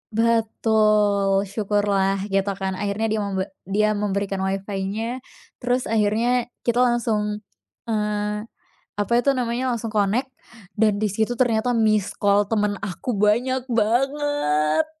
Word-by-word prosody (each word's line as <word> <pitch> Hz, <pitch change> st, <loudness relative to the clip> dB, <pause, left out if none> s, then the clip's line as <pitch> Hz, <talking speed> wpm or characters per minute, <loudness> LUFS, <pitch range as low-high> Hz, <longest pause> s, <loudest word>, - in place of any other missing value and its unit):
Betul, 215 Hz, -3 st, +2 dB
syukurlah 200 Hz, -1 st, 0 dB
gitukan 195 Hz, -1 st, -1 dB
akhirnya 205 Hz, +2 st, -1 dB
dia 220 Hz, -, 0 dB
membe 195 Hz, -2 st, -1 dB, 0.2 s
dia 215 Hz, +2 st, +2 dB
memberikan 200 Hz, -1 st, -2 dB
WiFi-nya 195 Hz, +5 st, -3 dB, 0.4 s
terus 245 Hz, +1 st, 0 dB
akhirnya 225 Hz, +3 st, +1 dB, 0.2 s
kita 235 Hz, 0 st, +1 dB
langsung, 220 Hz, -4 st, +1 dB, 0.4 s
eee, 210 Hz, -1 st, -2 dB, 0.5 s
apa 205 Hz, +3 st, -1 dB
itu 275 Hz, -, +2 dB
namanya, 250 Hz, +1 st, -1 dB
langsung 225 Hz, -1 st, -5 dB
connect 220 Hz, +6 st, 0 dB, 0.4 s
dan 215 Hz, -2 st, +2 dB
disitu 215 Hz, +3 st, -1 dB
ternyata 245 Hz, -1 st, +2 dB
misscall 205 Hz, -2 st, +2 dB
temen 210 Hz, -2 st, +1 dB
aku 200 Hz, +6 st, -3 dB
banyak 235 Hz, +6 st, +2 dB
banget. 240 Hz, -, +1 dB
210 Hz, 110 wpm, -23 LUFS, 200-235 Hz, 0.5 s, Betul